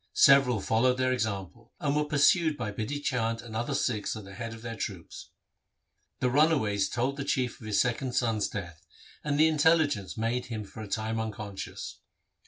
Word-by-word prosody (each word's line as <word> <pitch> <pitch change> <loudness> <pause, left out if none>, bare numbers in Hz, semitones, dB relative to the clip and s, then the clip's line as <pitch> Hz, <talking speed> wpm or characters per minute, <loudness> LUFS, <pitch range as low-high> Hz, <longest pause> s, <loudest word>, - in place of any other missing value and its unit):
Several 135 -4 +6
followed 125 +5 +2
their 130 0 +2
example, 110 -1 -4
and 145 -4 0
were 150 0 +2
pursued 150 +2 +3
by 115 -4 -3
Bidhi 125 +8 -4
Chand 115 -3 -1
and 115 -2 -9
other 120 +5 -1
Sikhs 115 -7 -1
at 110 - -7
the 100 0 -11
head 115 +3 -5
of 115 0 -10
their 115 -1 -5
troops. 95 -6 -6 0.9
The 125 - +2
runaways 130 -9 +3
told 130 +4 -1
the 140 - -3
Chief 130 -4 -1
of 110 - -8
his 105 -2 +1
second 125 +1 0
son's 115 -4 +1
death, 85 -6 -7 0.4
and 145 -1 0
the 155 - +7
intelligence 150 - +2
made 115 +3 -1
him 110 -3 -4
for 105 +2 -10
a 110 - -6
time 110 +2 -2
unconscious. 105 -3 -6
115 Hz, 185 wpm, -29 LUFS, 110-140 Hz, 0.9 s, the